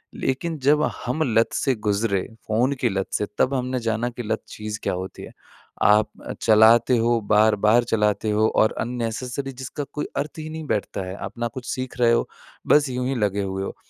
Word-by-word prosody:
लेकिन 155 Hz, +5 st, -2 dB
जब 145 Hz, +3 st, +3 dB, 0.2 s
हम 130 Hz, +6 st, -2 dB, 0.2 s
लत 115 Hz, -, +3 dB
से 135 Hz, -, +1 dB
गुजरे, 105 Hz, -2 st, 0 dB, 0.3 s
फ़ोन 120 Hz, +6 st, +2 dB
की 120 Hz, -, +3 dB
लत 95 Hz, -1 st, -2 dB
से, 105 Hz, -, 0 dB
तब 135 Hz, -, +2 dB
हमने 130 Hz, -1 st, -1 dB
जाना 115 Hz, +1 st, -1 dB
कि 120 Hz, 0 st, -7 dB
लत 110 Hz, +1 st, -2 dB
चीज़ 105 Hz, 0 st, -6 dB
क्या -, -, 0 dB
होती 95 Hz, +1 st, -6 dB
है। -, -, -10 dB, 0.5 s
आप 105 Hz, +1 st, +5 dB, 0.3 s
चलाते 115 Hz, +3 st, +5 dB
हो 115 Hz, +1 st, +2 dB
बार-बार 110 Hz, +2 st, +4 dB
चलाते 105 Hz, 0 st, +1 dB
हो 110 Hz, +1 st, +3 dB
और 110 Hz, -, +4 dB
अननेसेसरी 125 Hz, +3 st, -3 dB
जिसका 130 Hz, +3 st, -6 dB
कोई 150 Hz, -, -3 dB
अर्थ 150 Hz, +3 st, -3 dB
ही 155 Hz, -, -6 dB
नहीं 160 Hz, 0 st, -6 dB
बैठता 100 Hz, -1 st, -2 dB
है, 95 Hz, +1 st, -6 dB
अपना 120 Hz, 0 st, -3 dB
कुछ 120 Hz, +1 st, -8 dB
सीख 130 Hz, -1 st, -5 dB
रहे 120 Hz, -1 st, +5 dB
हो 115 Hz, -, +2 dB, 0.4 s
बस 145 Hz, -2 st, +4 dB
यूँ 125 Hz, 0 st, -2 dB
ही 135 Hz, -, -1 dB
लगे 100 Hz, -3 st, 0 dB
हुए 95 Hz, 0 st, -3 dB
हो। -, -, -5 dB
115 Hz, 195 wpm, -23 LUFS, 105-130 Hz, 0.5 s, आप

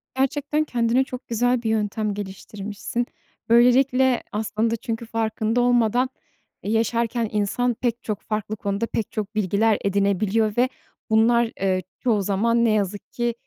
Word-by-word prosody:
Gerçekten 290 Hz, +3 st, 0 dB
kendine 245 Hz, -2 st, +1 dB
çok 255 Hz, -1 st, -8 dB
güzel 245 Hz, +1 st, +1 dB
bir 225 Hz, -, 0 dB
yöntem 215 Hz, -1 st, 0 dB
geliştirmişsin. 205 Hz, +3 st, -5 dB, 0.4 s
Böylelikle 255 Hz, +2 st, +4 dB
aslında 220 Hz, +2 st, -1 dB
çünkü 230 Hz, 0 st, -4 dB
farkında 225 Hz, +1 st, 0 dB
olmadan, 245 Hz, +1 st, +3 dB, 0.5 s
eee, 205 Hz, -, -2 dB
yaşarken 230 Hz, 0 st, 0 dB
insan 215 Hz, +4 st, 0 dB
pek 235 Hz, 0 st, -2 dB
çok 210 Hz, -2 st, -3 dB
farklı 215 Hz, 0 st, -3 dB
konuda 200 Hz, +1 st, -2 dB
pek 225 Hz, -2 st, -3 dB
çok 215 Hz, -1 st, -4 dB
bilgiler 210 Hz, +1 st, +2 dB
edinebiliyor 200 Hz, +2 st, +1 dB
ve 250 Hz, +1 st, +3 dB, 0.4 s
bunlar, 230 Hz, +1 st, +4 dB
eee, 190 Hz, -1 st, +1 dB, 0.2 s
çoğu 225 Hz, -5 st, +1 dB
zaman 230 Hz, +5 st, +2 dB
ne -, -, +3 dB
yazık 205 Hz, -1 st, -2 dB
ki, 240 Hz, -1 st, -1 dB
225 Hz, 140 wpm, -23 LUFS, 210-240 Hz, 0.5 s, Böylelikle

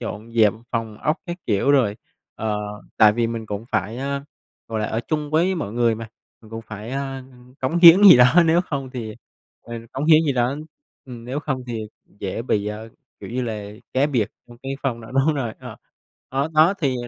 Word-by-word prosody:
dọn 115 Hz, 0 st, -7 dB
dẹp 110 Hz, -3 st, +4 dB, 0.2 s
phòng 115 Hz, -3 st, -3 dB
ốc 155 Hz, +2 st, 0 dB
các 175 Hz, 0 st, -4 dB
kiểu 105 Hz, +6 st, +2 dB
rồi, 120 Hz, -7 st, +3 dB, 0.4 s
ờ, 110 Hz, -1 st, -2 dB, 0.4 s
tại 105 Hz, -1 st, +6 dB
vì 115 Hz, +1 st, 0 dB
mình 115 Hz, -1 st, -5 dB
cũng 105 Hz, +2 st, -5 dB
phải, 110 Hz, +2 st, -1 dB
a, 140 Hz, +1 st, -3 dB, 0.4 s
gọi 110 Hz, -1 st, -2 dB
là, 105 Hz, -, -1 dB
ở 110 Hz, -, -2 dB
chung 150 Hz, -2 st, -2 dB
với 175 Hz, +4 st, +2 dB
mọi 105 Hz, -, -4 dB
người 115 Hz, -1 st, +2 dB
mà, 110 Hz, 0 st, -8 dB, 0.3 s
mình 110 Hz, -, -17 dB
cũng 115 Hz, 0 st, -6 dB
phải, 110 Hz, +2 st, -8 dB
a, 135 Hz, -1 st, -4 dB, 0.4 s
cống 135 Hz, +7 st, 0 dB
hiến 175 Hz, +3 st, +9 dB
gì 195 Hz, -9 st, +10 dB
đó, 125 Hz, +8 st, +6 dB
nếu 165 Hz, +2 st, +4 dB
hông 135 Hz, -3 st, -4 dB
thì 115 Hz, -4 st, -6 dB, 0.5 s
ừ, 120 Hz, -, -9 dB, 0.2 s
cống 135 Hz, +3 st, -3 dB
hiến 155 Hz, 0 st, +6 dB
gì 140 Hz, -, +2 dB
đó 125 Hz, +2 st, 0 dB, 0.5 s
ừm, 120 Hz, -3 st, -10 dB
nếu 135 Hz, +4 st, -3 dB
không 135 Hz, -3 st, -3 dB
thì 115 Hz, -2 st, -4 dB, 0.4 s
dễ 100 Hz, +3 st, -3 dB
bị, 105 Hz, -4 st, 0 dB
ờ, 105 Hz, +2 st, -6 dB, 0.3 s
kiểu -, -, -8 dB
như 125 Hz, +2 st, -2 dB
là, 105 Hz, -3 st, -5 dB, 0.2 s
cá 135 Hz, +3 st, +2 dB
biệt 120 Hz, -8 st, 0 dB, 0.2 s
trong 120 Hz, 0 st, -14 dB
cái 135 Hz, -, -4 dB
phòng 120 Hz, -4 st, -2 dB
đó 115 Hz, -, -12 dB
đúng 140 Hz, +3 st, +2 dB
rồi, 120 Hz, -6 st, -3 dB
ờ. -, -, -9 dB, 0.5 s
Đó, 135 Hz, +3 st, -1 dB
đó 160 Hz, +5 st, +5 dB
thì 135 Hz, -6 st, 0 dB
120 Hz, 210 wpm, -22 LUFS, 110-140 Hz, 0.5 s, gì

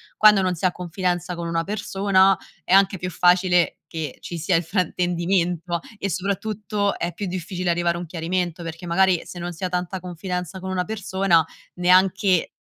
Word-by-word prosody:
quando 210 Hz, -2 st, +6 dB
non 185 Hz, -1 st, 0 dB
si 165 Hz, -, -12 dB
ha 185 Hz, -, +4 dB
confidenza 180 Hz, 0 st, -2 dB
con 170 Hz, 0 st, -4 dB
una 165 Hz, 0 st, 0 dB
persona 195 Hz, -1 st, +2 dB, 0.3 s
è -, -, -6 dB
anche 195 Hz, 0 st, +5 dB
più 180 Hz, +1 st, -4 dB
facile 180 Hz, 0 st, +3 dB
che 160 Hz, -3 st, -5 dB
ci 170 Hz, -, -6 dB
sia 170 Hz, +2 st, +1 dB
il 165 Hz, -, +3 dB
fraintendimento 175 Hz, -1 st, 0 dB, 0.2 s
e 200 Hz, -1 st, -3 dB
soprattutto 205 Hz, +1 st, -2 dB
è 170 Hz, -, -1 dB
più 205 Hz, -, -5 dB
difficile 180 Hz, -1 st, -2 dB
arrivare 170 Hz, 0 st, +1 dB
a -, -, -4 dB
un 175 Hz, -, -5 dB
chiarimento, 175 Hz, +1 st, -2 dB
perché 165 Hz, +1 st, -7 dB
magari 180 Hz, 0 st, +3 dB
se 175 Hz, -, -9 dB
non 175 Hz, +1 st, -4 dB
si 165 Hz, -, -10 dB
ha 185 Hz, -, 0 dB
tanta 180 Hz, +1 st, -2 dB
confidenza 180 Hz, 0 st, -5 dB
con 190 Hz, +1 st, -6 dB
una 185 Hz, -1 st, 0 dB
persona, 190 Hz, -4 st, +1 dB, 0.3 s
neanche 185 Hz, 0 st, +3 dB
180 Hz, 180 wpm, -23 LUFS, 175-190 Hz, 0.3 s, quando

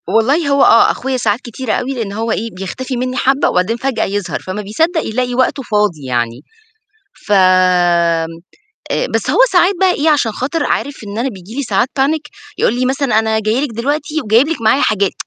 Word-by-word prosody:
والله 250 Hz, -, +2 dB
هو 280 Hz, -1 st, +3 dB
آه، 230 Hz, -, +6 dB
أخويا 265 Hz, 0 st, -3 dB
ساعات 220 Hz, -2 st, 0 dB
كتيرة 240 Hz, 0 st, -4 dB
أوي 265 Hz, +2 st, -2 dB
لإن 230 Hz, -6 st, -4 dB
هو 225 Hz, +2 st, -2 dB
إيه، 225 Hz, +2 st, -2 dB
بيختفي 245 Hz, +8 st, -5 dB
منّي 255 Hz, +1 st, -3 dB
حبّة 270 Hz, +3 st, +2 dB
وبعدين 185 Hz, +6 st, 0 dB
فجأة، 245 Hz, -3 st, -1 dB
يظهر 205 Hz, 0 st, -3 dB
فما 190 Hz, +3 st, -5 dB
بيصدّق 320 Hz, -, 0 dB
يلاقي 245 Hz, +2 st, -2 dB
وقته 260 Hz, +2 st, 0 dB
فاضي 210 Hz, -, -1 dB
يعني، 120 Hz, -1 st, -2 dB, 0.9 s
فم 210 Hz, -, +1 dB, 1.6 s
آآ، -, -, 0 dB
بس -, -, 0 dB
هو -, -, 0 dB
ساعات 365 Hz, +2 st, +4 dB
بقى 380 Hz, -1 st, +4 dB
إيه، 320 Hz, -2 st, 0 dB
عشان 275 Hz, -7 st, +1 dB
خاطر 280 Hz, +9 st, -2 dB
عارف 280 Hz, -5 st, -2 dB
إن 200 Hz, +2 st, -6 dB
أنا 245 Hz, +3 st, 0 dB
بييجي 200 Hz, -2 st, -10 dB
لي 280 Hz, -, -1 dB
ساعات 245 Hz, -1 st, 0 dB
panic 295 Hz, +2 st, 0 dB, 0.3 s
يقول -, -, +2 dB
لي 255 Hz, -, +1 dB
مثلًا 265 Hz, -4 st, +1 dB
أنا 220 Hz, 0 st, +1 dB
جاي 220 Hz, +4 st, 0 dB
لِك 290 Hz, -, -4 dB
دلوقتي 290 Hz, +6 st, -2 dB
وجايب 230 Hz, +7 st, +3 dB
لِك 330 Hz, -, -3 dB
معايا 230 Hz, +6 st, +3 dB
حاجات. 200 Hz, -6 st, +1 dB
240 Hz, 195 wpm, -15 LUFS, 210-275 Hz, 1.6 s, آه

